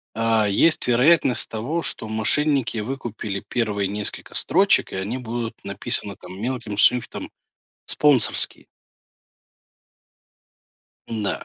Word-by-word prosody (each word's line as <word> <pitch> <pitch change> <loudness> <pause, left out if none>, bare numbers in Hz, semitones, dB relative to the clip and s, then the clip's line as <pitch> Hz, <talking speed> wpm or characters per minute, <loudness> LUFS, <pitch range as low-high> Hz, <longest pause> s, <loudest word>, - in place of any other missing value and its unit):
а, 115 -1 +2
есть 155 +11 +2
вероятность 125 0 +3
того, 130 +10 -3
что 110 - -3
мошенники 130 +3 +1
выкупили 110 -4 -5
1 105 -4 -1
несколько 105 +1 -4
строчек, - - +2
и - - -4
они 100 +7 -3
будут 120 -2 -5
написаны 100 0 0
там 90 +2 -11
мелким 115 -3 -3
шрифтом, 120 +3 +2 0.6
спонсорские. 145 -6 +1 2.4
Н-да. 105 -5 -3
115 Hz, 100 wpm, -22 LUFS, 105-125 Hz, 2.4 s, вероятность